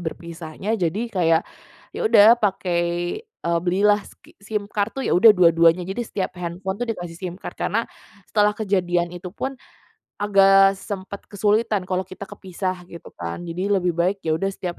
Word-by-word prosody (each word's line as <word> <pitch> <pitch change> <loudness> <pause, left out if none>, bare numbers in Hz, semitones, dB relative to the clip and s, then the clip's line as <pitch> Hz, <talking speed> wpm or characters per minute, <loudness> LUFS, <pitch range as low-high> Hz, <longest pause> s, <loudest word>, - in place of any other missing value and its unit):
berpisahnya, 170 +3 -5
jadi 180 +1 -1
kayak, 165 -4 +3 0.6
ya, - - -4
udah, 230 - +7
pakai, 185 -4 0 0.4
eee, 170 - -2
belilah 205 +3 +3
ski - - -20
SIM 210 0 -3
card, 205 +3 -2
tuh, 270 - -3
ya, - - 0
udah 215 +4 +8
dua-duanya. 170 -1 +4
Jadi 195 +5 -3
setiap 190 -4 -4
handphone, 180 +3 -4
tuh, 245 - -2
dikasih 175 -4 -8
SIM 180 -2 -5
card - - -8
karena 230 +2 -1 0.4
setelah 210 -1 +3
kejadian 175 -4 0
itu, 180 +1 -7
pun, 265 +5 -4 0.6
agak 195 -1 +5
sempat 195 0 -7
kesulitan 210 0 +1
kalau 185 0 -1
kita 185 - -12
kepisah, 185 -1 -5
gitu, 170 - -11
kan. 85 - -5
Jadi 175 +3 -4
lebih 180 -3 +1
baik, 185 +3 +1
ya, 160 -1 0
udah 195 +2 -1
setiap 180 -2 -6
190 Hz, 165 wpm, -22 LUFS, 175-205 Hz, 0.6 s, udah